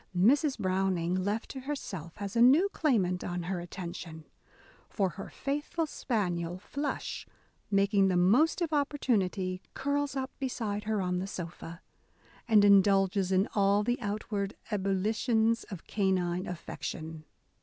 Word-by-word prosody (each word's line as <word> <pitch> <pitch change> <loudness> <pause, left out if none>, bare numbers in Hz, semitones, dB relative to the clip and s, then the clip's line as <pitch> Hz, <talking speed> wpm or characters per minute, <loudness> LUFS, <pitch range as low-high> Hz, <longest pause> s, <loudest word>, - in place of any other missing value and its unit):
Mrs. 270 - +4
Browning, 185 -3 0
left 200 +5 -1
to 270 - -6
herself, 200 - -6
has 200 0 -5
a 230 - +3
new 290 +11 +6
claimant 200 - +1
on 175 0 -3
her 180 +1 -2
attention: 170 -2 -7 0.6
for 195 -3 0
her 195 - -8
faithful 295 +4 -2
spaniel 180 - -2
Flush, 285 +9 -4 0.4
making 200 0 +3
the 185 -2 +2
most 245 - +4
of 325 -2 -1
opportunity, 200 -10 0
curls 285 0 -1
up 265 0 -3
beside 220 -6 -3
her 215 -2 0
on 180 0 0
the 190 - -3
sofa, 170 -2 -7 0.6
and 215 -3 +6
indulges 195 -1 +4
in 190 +2 +3
all 200 0 +3
the 240 +2 -1
outward 205 -1 -3 0.2
ebullitions 220 +4 +1
of 190 -5 -9
canine 185 -3 0
affection. 160 -2 -6
200 Hz, 135 wpm, -30 LUFS, 185-240 Hz, 0.6 s, new